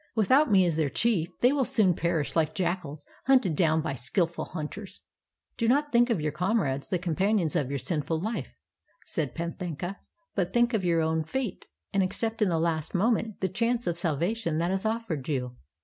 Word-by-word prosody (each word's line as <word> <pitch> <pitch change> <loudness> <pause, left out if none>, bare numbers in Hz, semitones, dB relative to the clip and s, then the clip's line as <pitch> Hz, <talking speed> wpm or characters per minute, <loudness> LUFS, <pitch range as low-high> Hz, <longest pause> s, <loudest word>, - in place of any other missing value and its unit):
Without 260 +7 +4
me 190 -2 +6
as 165 -3 0
their 155 -3 +1
chief 180 - +1
they 245 - +5
will 285 -2 +2
soon 205 -6 +3
perish 165 -3 -1
like 160 -1 +1
jackals 170 -4 -2 0.2
hunted 255 - +4
doun 160 -1 +3
by 145 - -2
skillful 165 - -1
hunters." 180 +5 -6 0.6
"Do 230 - 0
not 290 +4 +2
think 240 +1 +4
of 225 -7 +1
your 150 0 -1
comrades, 155 -5 0
the 185 - 0
companions 180 0 0
of 135 - 0
your 140 - -1
sinful 160 +2 -1
Ufe," 220 +4 -3 0.6
said 150 -6 -3
Panthaka, 175 +2 -4 0.4
"but 185 -3 -1
think 240 0 +3
of 215 -4 +1
your 170 -2 +2
own 160 0 +1
fate, 240 +7 -4 0.3
and 195 - +3
accept 225 +4 -1
in 210 - +4
the 165 - +1
last 160 +1 -1
moment 220 +2 +1
the 190 - +2
chance 230 +5 0
of 175 - 0
sal 170 -4 0
vation 175 -1 -1
that 170 +2 0
is 190 +3 0
offered 215 - -3
you. 125 -4 -2
175 Hz, 195 wpm, -28 LUFS, 160-220 Hz, 0.6 s, me